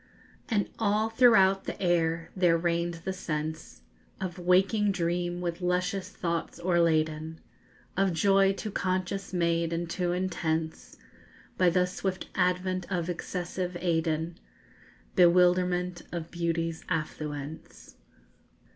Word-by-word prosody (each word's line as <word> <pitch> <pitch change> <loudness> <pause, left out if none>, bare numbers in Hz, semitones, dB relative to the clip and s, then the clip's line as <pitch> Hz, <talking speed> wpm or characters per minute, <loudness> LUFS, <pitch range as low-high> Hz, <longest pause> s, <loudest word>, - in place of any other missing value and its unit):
And 210 -4 +1
all 215 0 +2
throughout 195 -5 +5
the - - -5
air 170 -2 +1
there 175 -3 +4
reigned 170 0 -1
the 190 - -1
sense 155 -3 -5 0.4
Of 185 -1 -4
waking 195 +4 +3
dream 175 0 -1
with 175 0 -3
luscious 180 +2 -1
thoughts 170 -2 -3
o'erladen, 160 -2 +1 0.6
Of 195 0 +2
joy 195 +3 +4
too 210 +2 -5
conscious 185 +1 -2
made 170 -2 +1
and 170 +1 -2
too 175 +1 -1
intense 165 -3 -2 0.6
By 180 -1 +4
the 180 +1 +3
swift 185 +1 -4
advent 185 0 0
of 175 -1 -1
excessive 180 +1 -4
Aiden, 165 -1 0 0.8
_Bewilderment 180 0 +3
of 170 -1 -5
beauty's 165 -1 -2
affluence. 150 -2 -5
175 Hz, 110 wpm, -28 LUFS, 165-185 Hz, 0.8 s, throughout